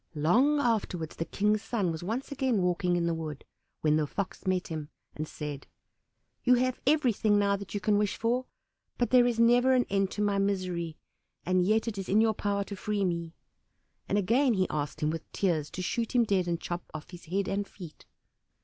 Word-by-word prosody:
Long 245 - +3
afterwards 205 - -1
the 165 - -2
King's 210 +3 +1
son 220 -6 -1
was 160 - -5
once 225 +11 -3
again 260 -8 +1
walking 180 0 +1
in 170 -1 +1
the 170 - +1
wood, 155 -3 -6 0.4
when 155 0 +3
the 150 -1 0
Fox 195 +3 -5
met 185 -1 0
him 155 -2 -5 0.3
and 155 +1 -4
said, 150 -2 -6 0.8
"You 250 0 +5
have 255 +1 0
everything 240 -8 +3
now 200 -1 +3
that 200 +1 -7
you - - 0
can 205 +1 +2
wish 210 -1 0
for, 245 +3 0 0.5
but 240 - 0
there 250 -1 +6
is 235 -2 -1
never 245 +3 +5
an 250 - +3
end 195 -1 +2
to 210 - -1
my 200 -1 +1
misery, 185 -5 -1 0.5
and 185 0 +3
yet 220 +4 +2
it 210 -3 -3
is 195 - -5
in 205 - +4
your 220 0 +4
power 200 -1 -1
to 200 - -7
free 205 0 -1
me," 170 -2 -3 0.7
and 200 - +2
again 235 +5 +3
he 185 -1 +2
asked 145 -1 -3
him 150 0 +1
with 165 0 -6
tears 165 -6 0
to 185 - -5
shoot 235 +6 -2
him 240 - +6
dead 195 -5 +1
and 170 -1 -1
chop 175 0 -5
off 155 +2 -8
his 175 -1 -11
head 190 +4 -1
and 200 0 -1
feet. 175 -6 -12
200 Hz, 210 wpm, -29 LUFS, 170-225 Hz, 0.8 s, there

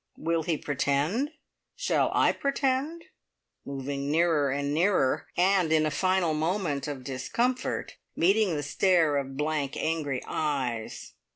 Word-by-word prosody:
Will 165 +1 0
he 165 -1 -1
pretend? 145 - 0 0.5
Shall - - +1
I - - +4
pretend?" 275 +4 -1 0.6
moving 140 +1 -4
nearer 160 -2 +2
and 140 +1 -1
nearer, 165 -5 +2
and 180 -2 +3
in 155 -1 +4
a 155 - 0
final 185 0 +1
moment 160 -2 -1
of 140 -3 -5
discomfort 240 - -2 0.2
meeting 195 +1 +3
the 145 - -2
stare 165 0 +2
of 135 -1 -4
blank, 150 -2 -1
angry 150 -5 -1
eyes. 130 -7 -3
155 Hz, 125 wpm, -28 LUFS, 140-185 Hz, 0.6 s, I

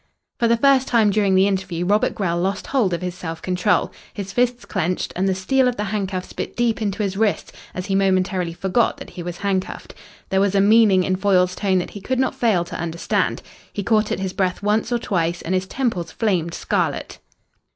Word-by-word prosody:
For 235 - +3
the 230 0 +3
first 270 +1 +4
time 225 -4 +3
during 200 -2 +2
the 190 +1 +5
interview 190 -3 -1
Robert 205 +3 +2
Grell 170 -4 -1
lost 195 +2 -1
hold 240 -9 +1
of 170 +1 -2
his 180 -1 -3
self 165 -2 -6
control. 180 +3 +1 0.2
His 195 -1 -6
fists 245 0 0
clenched 180 -2 -2
and 190 +2 0
the 190 - +1
steel 255 +8 +2
of 250 - 0
the 210 - -2
handcuffs 190 -3 -3
bit - - -5
deep 235 -2 0
into 205 0 -1
his 195 -1 -2
wrists 215 -1 0 0.2
as 185 - -4
he 200 - -2
momentarily 185 -2 +1
forgot 190 +7 +1
that - - -10
he 180 - -7
was 175 0 -5
handcuffed. 195 -1 -3 0.4
There 190 0 +2
was 200 0 +1
a - - +4
meaning 205 -2 +5
in 185 0 0
Foyle's 185 -2 +3
tone 190 -1 +1
that 180 - -2
he 205 - -9
could 260 +6 -2
not 260 0 +1
fail 205 -8 +1
to 175 - -7
understand. 170 0 -1 0.3
He 205 - -4
caught 215 +1 +2
at - - 0
his 190 -1 -3
breath 185 -1 -1
once 210 +3 +1
or 240 - +2
twice 175 -6 -1
and 175 - -2
his 185 0 0
temples 190 -10 -2
flamed 180 -7 -1
scarlet. - - -2
195 Hz, 215 wpm, -21 LUFS, 185-215 Hz, 0.4 s, the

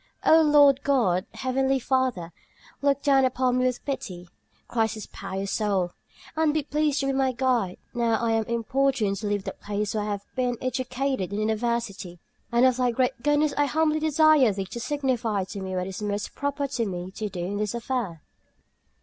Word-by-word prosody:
"O 320 +1 +7
Lord 290 -3 +5
God, 225 -11 +1
Heavenly 265 +1 +1
Father, 255 -10 0 0.5
look 280 -1 +1
down 275 -2 +4
upon 255 -1 +1
me 255 - +2
with 250 -1 -3
pity," 180 -11 -5 0.4
cries 225 -2 0
this 215 - -7
pious 195 +1 -5
soul, 195 -5 0 0.4
"and 315 -1 +2
be 310 - +1
pleased 300 0 0
to - - -1
be 275 - +1
my 265 -1 +1
guide, 240 -7 0 0.2
now 235 -2 +1
I 230 0 0
am 225 -1 +1
importuned 235 -2 0
to 210 +2 -4
leave 205 -1 -1
the - - -4
place 205 0 -3
where 215 - -1
I 210 - -3
have 205 -1 -3
been 250 -2 0
educated 255 -3 -2
in - - -3
the 215 - -1
university. 220 -4 -2 0.3
And 235 +2 +4
of 255 -1 +3
Thy 250 -1 +2
great 245 0 0
goodness 295 +2 +2
I 290 - +3
humbly 310 +1 +1
desire 310 -5 +4
Thee 195 -1 -3
to 215 +5 -7
signify 245 -7 -1
to 195 +1 -7
me 190 0 -4
what 180 0 -1
is 190 +2 -6
most 205 0 -3
proper 285 0 -2
for 260 -3 -2
me 180 -1 -5
to 210 +2 -4
do 185 -2 -7
in 200 +3 -3
this 210 +2 -2
affair." 235 - -3
240 Hz, 195 wpm, -26 LUFS, 205-275 Hz, 0.5 s, O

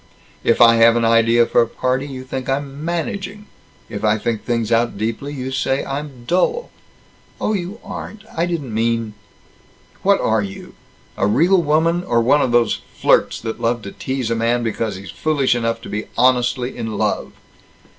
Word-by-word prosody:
"If 115 - +2
I 115 -1 +7
have 115 0 +6
an 115 -1 +2
idea 115 +1 +4
for - - +3
a 115 - +1
party, 130 +4 -1
you 130 -2 -7
think 130 0 -5
I'm 140 +1 -3
'managing.' 195 +5 -3 0.4
If 105 -1 -6
I 110 0 +3
think 110 0 -2
things 115 -2 -1
out 115 -1 +2
deeply, 115 +7 -3
you 130 -2 -5
say 135 0 0
I'm 135 -3 -6
dull." 185 - 0 0.7
"Oh, 215 - 0
you 195 +3 -4
aren't. 210 -2 -8
I 170 +2 +1
didn't 150 -9 -3
mean 115 0 0 0.4
" - - -31
"What 200 0 +3
are 110 -1 +2
you? 95 -1 -8 0.4
A 95 - +2
real 175 - +4
woman, 165 +3 +2
or 120 -9 +1
one 135 +5 +4
of 125 - +1
these 120 -2 +2 0.2
flirts, - - +2
that 110 -1 -5
love 115 -1 0
to 100 - -7
tease 130 -3 -3
a - - +2
man 115 +1 +1
because 115 -1 -2
he's 95 +1 -9
foolish 145 -5 +1
enough 115 -1 -1
to - - -8
be 105 +1 -4
honestly 125 0 +2
in 110 -3 -4
love?" - - -1
120 Hz, 185 wpm, -20 LUFS, 115-145 Hz, 0.7 s, I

